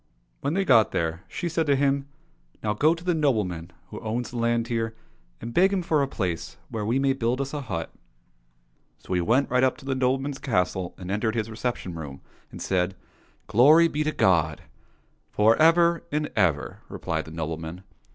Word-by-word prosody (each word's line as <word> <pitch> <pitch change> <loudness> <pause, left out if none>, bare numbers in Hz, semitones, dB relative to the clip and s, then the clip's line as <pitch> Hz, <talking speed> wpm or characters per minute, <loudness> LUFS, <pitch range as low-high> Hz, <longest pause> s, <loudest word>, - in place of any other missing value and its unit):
When 145 - -1
they 195 0 +1
got 115 - +5
there, 80 +2 -1
she 175 - -4
said 165 -1 0
to 140 - +4
him, 140 0 +1 0.3
'* - - -36
Now 105 -1 +1
go 155 +10 +3
to 165 - -12
the 180 0 +1
nobleman 105 - 0 0.2
who - - -7
owns 115 +2 -3
the 120 - -6
land 115 0 +1
here, 115 -1 -2 0.4
and 115 +1 -7
beg 190 +6 +4
him 190 -2 0
for 155 -3 +2
a 140 - +1
place 90 - -3
where 110 -2 -3
we 115 +5 +1
may 135 0 +2
build 125 0 -1
us 140 +1 -3
a 145 - -3
hut." 95 - -4 1.1
So - - -6
he 90 - +2
went 120 +10 +2
right 125 0 +3
up 130 - +2
to 145 - -14
the 135 - 0
nobleman's 135 +2 0
castle 90 -6 -1
and 90 0 -6
entered 110 +2 0
his 110 -1 -2
reception 110 -5 -3
room, 75 -5 -8 0.3
and - - -10
said, 95 0 0 0.3
" - - -35
Glory 145 +10 +6
be 150 -1 -1
to 155 - 0
God! 80 - +2 0.2
" - - -36
— - - -41
" - - -44
For 110 +2 +5
ever 170 +1 +5
and 150 0 -1
ever! 85 -9 +1
" - - -33
replied - - -3
the 80 - -10
nobleman. 80 +2 -5
115 Hz, 210 wpm, -25 LUFS, 95-140 Hz, 1.1 s, Glory